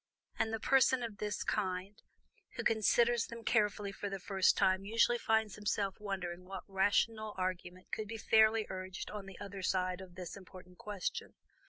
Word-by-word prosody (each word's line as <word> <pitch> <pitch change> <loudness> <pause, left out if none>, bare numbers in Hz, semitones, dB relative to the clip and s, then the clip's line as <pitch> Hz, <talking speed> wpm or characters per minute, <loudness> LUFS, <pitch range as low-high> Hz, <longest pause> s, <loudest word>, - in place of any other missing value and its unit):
And 220 - +1
the 225 - -2
person 260 0 +4
of 215 -4 -6
this 210 -2 -2
kind 190 0 -2 0.5
who - - -3
considers 230 +2 +3
them 235 0 -8
carefully 210 -3 +1
for 205 +1 -5
the 195 - -3
first 190 0 +3
time 190 0 +3
usually 230 +3 +3
finds 220 -3 +1
himself 205 -2 -1
wondering 185 -4 -4
what 190 0 -7
rational 210 +2 +1
argument 185 0 -4
can 215 - -3
be 225 +2 -5
fairly 220 0 +4
urged 185 0 -6
on 205 -2 -6
the 195 - -10
other 200 -1 -7
side 185 0 0
of 180 -2 -11
this 180 -2 -6
important 185 -2 -13
question. 205 -3 -4
200 Hz, 170 wpm, -34 LUFS, 185-220 Hz, 0.5 s, person